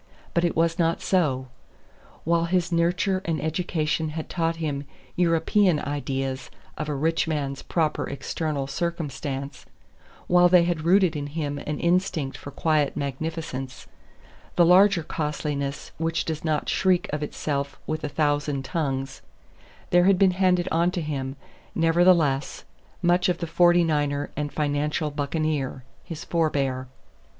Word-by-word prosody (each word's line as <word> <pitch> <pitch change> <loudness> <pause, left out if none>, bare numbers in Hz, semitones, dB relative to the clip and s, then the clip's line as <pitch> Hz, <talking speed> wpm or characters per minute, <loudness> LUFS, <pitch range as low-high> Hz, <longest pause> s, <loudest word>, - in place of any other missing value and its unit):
But 170 - +2
it 170 - +1
was 165 +1 +1
not 165 0 +2
so. 145 -9 +1 0.8
While 170 +1 +2
his 175 0 0
nurture 175 +3 +1
and 160 -2 -1
education 160 -1 -1
had 160 - -5
taught 165 -1 0
him 145 -3 -3 0.3
European 170 +1 +3
ideas 135 -2 -3 0.3
of 155 0 -4
a 150 - -1
rich 160 +4 +1
man's 140 -3 -2
proper 160 -3 -1
external 145 0 -3
circumstance; 140 -3 -4 0.6
while 175 0 +5
they 180 -1 +6
had 170 -2 -1
rooted 185 -1 +4
in 145 -1 -3
him 145 -1 -3
an 150 0 -4
instinct 170 -6 0
for 140 - -8
quiet 150 0 0
magnificence, 140 -2 -4 0.7
the 175 - +5
larger 185 0 +5
costliness 150 -2 -3
which 165 0 -1
does 160 -1 -4
not 155 -2 0
shriek 185 -2 +2
of 150 - -1
itself 140 -1 -3
with 155 0 -3
a 150 - -2
thousand 145 -2 0
tongues; 135 -3 -3 0.7
there 175 0 +5
had 195 -1 +5
been 190 -1 +5
handed 180 -1 +2
on 170 +2 +3
to 180 -1 -3
him, 135 -3 -3 0.4
nevertheless, 165 -4 +3 0.4
much 175 +1 +3
of 175 - +1
the 170 - -3
Forty 175 +1 +4
Niner 145 -3 0
and 145 0 -3
financial 150 +1 -1
buccaneer, 145 -2 -2 0.2
his 165 -1 -7
forbear. 140 -6 0
155 Hz, 140 wpm, -25 LUFS, 145-170 Hz, 0.8 s, they